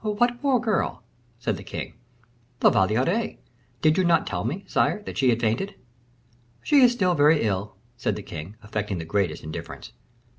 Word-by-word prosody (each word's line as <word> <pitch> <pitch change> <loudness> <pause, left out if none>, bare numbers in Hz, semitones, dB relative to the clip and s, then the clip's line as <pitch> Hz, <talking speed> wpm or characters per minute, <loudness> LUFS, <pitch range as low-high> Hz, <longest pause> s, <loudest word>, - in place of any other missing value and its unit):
"What 240 +3 0
poor 270 -3 +3
girl?" 220 - -1 0.3
said 120 - -2
the - - -9
king. - - -6 0.7
"La - - +7
Valliere. 125 - +1 0.5
Did 155 +3 +4
you - - +4
not 170 -2 +3
tell 90 -2 -3
me, 155 - -3
sire, 210 - +1
that - - -7
she 130 -2 +3
had 115 -1 +2
fainted?" 120 - -1 0.9
"She 295 - +3
is 250 -2 +7
still 185 -7 +1
very 150 -1 +4
ill," 100 -1 -2 0.2
said - - -1
the - - -7
king, 80 +7 -8
affecting 105 -2 -3
the 80 - -5
greatest 100 +2 -1
indifference. 80 0 -7
140 Hz, 175 wpm, -25 LUFS, -, 0.9 s, La